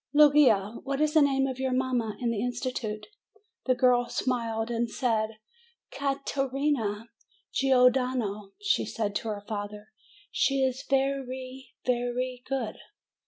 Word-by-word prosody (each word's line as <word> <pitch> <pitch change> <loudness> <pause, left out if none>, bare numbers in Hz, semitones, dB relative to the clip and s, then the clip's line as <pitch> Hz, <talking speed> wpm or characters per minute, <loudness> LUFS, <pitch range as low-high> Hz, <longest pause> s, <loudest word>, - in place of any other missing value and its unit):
Luigia, 265 -9 +5
what 275 +1 -2
is 305 0 +2
the 315 - +6
name 270 -1 +3
of 260 -1 -4
your 265 0 0
mamma 255 -4 0
in 240 -2 0
the 215 -3 -2
institute 245 -3 -3 0.3
?" 430 0 -35
The 255 - +4
girl 245 -1 +3
smiled, 230 -2 -1
and 235 0 0
said, 220 -3 -1 0.5
"Ca 275 -1 -2
te 275 - -1
rina 235 -6 -1 0.4
Gior 250 -2 +5
dano." 245 -6 -1
Then 195 - -24
she 415 0 +1
said 210 -3 -3
to - - -6
her 205 -2 -4
father, 210 0 -5 0.4
"She 275 -1 +2
is 260 0 -1
ve 270 0 +3
ry, 260 -1 -6 0.2
ve 245 -1 +1
ry 255 0 -2
good." 260 -5 -3
250 Hz, 160 wpm, -28 LUFS, 225-270 Hz, 0.5 s, the